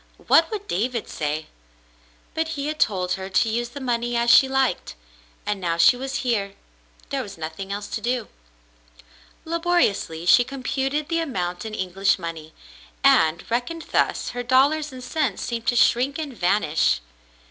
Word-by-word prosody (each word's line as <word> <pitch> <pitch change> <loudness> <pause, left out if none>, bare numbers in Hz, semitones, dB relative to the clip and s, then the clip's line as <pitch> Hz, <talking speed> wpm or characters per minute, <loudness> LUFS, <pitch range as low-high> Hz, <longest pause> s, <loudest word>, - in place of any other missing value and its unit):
What 325 0 +5
would 415 -2 -5
David 230 +5 -2
say? 150 +1 -3 0.9
But 320 0 -1
he 280 - -3
had 305 +1 -3
told 185 -4 +1
her 190 +1 -3
to 220 +4 +2
use 240 +2 -1
the 280 - -8
money 240 -2 -1
as 235 0 +3
she 270 - +7
liked, 265 - 0 0.5
and 205 -2 -2
now 170 -2 -1
she 170 +9 +6
was 265 +2 -5
here, 200 -5 -1 0.5
there - - -1
was - - -9
nothing 165 +5 -6
else 205 +1 -4
to - - -4
do. 240 -2 -1 1.2
Laboriously 330 - 0
she 245 +7 +6
computed 270 +3 -2
the 330 0 0
amount 180 - -3
in 215 -1 -5
English 190 +1 +1
money, 165 -3 -7 0.5
and, 160 +1 +4
reckoned 310 +8 -2
thus, - - +1
her 245 - -4
dollars 280 +5 +2
and 255 -1 -9
cents 255 -4 -1
seemed 230 -1 -4
to 245 - +2
shrink 255 +4 +3
and 295 -5 -5
vanish. 175 - +2
235 Hz, 160 wpm, -23 LUFS, 190-270 Hz, 1.2 s, she